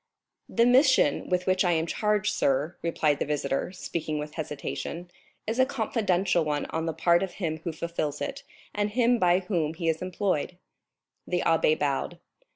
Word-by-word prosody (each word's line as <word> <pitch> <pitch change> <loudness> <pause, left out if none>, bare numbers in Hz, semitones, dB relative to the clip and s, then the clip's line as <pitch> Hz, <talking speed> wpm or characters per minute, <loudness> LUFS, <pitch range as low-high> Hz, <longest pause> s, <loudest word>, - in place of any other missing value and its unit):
"The 235 - +3
mission 255 - +4
with 180 0 0
which 185 0 +2
I 175 -2 +3
am 160 0 +1
charged, 210 +3 0
sir," 145 0 +1
replied 155 -3 +1
the - - 0
visitor, 145 +2 -1
speaking 160 -4 -4
with 150 0 -5
hesitation, 165 +3 -5 0.3
"is 225 +3 -2
a 260 - +6
confidential 200 - +1
one 150 -1 -1
on 160 0 -2
the 165 - -1
part 170 +2 +3
of 190 -2 -3
him 160 -5 -3
who 165 +1 -4
fulfils 160 -2 -3
it, 275 -1 -4 0.3
and 205 0 0
him 240 +2 +2
by 180 -1 +3
whom 170 -5 -1
he 165 0 -3
is 160 -1 0
employed." 185 -2 -1 0.7
The 180 -1 0
abbé 160 -1 +3
bowed. 145 +4 -1
175 Hz, 170 wpm, -27 LUFS, 155-205 Hz, 0.7 s, a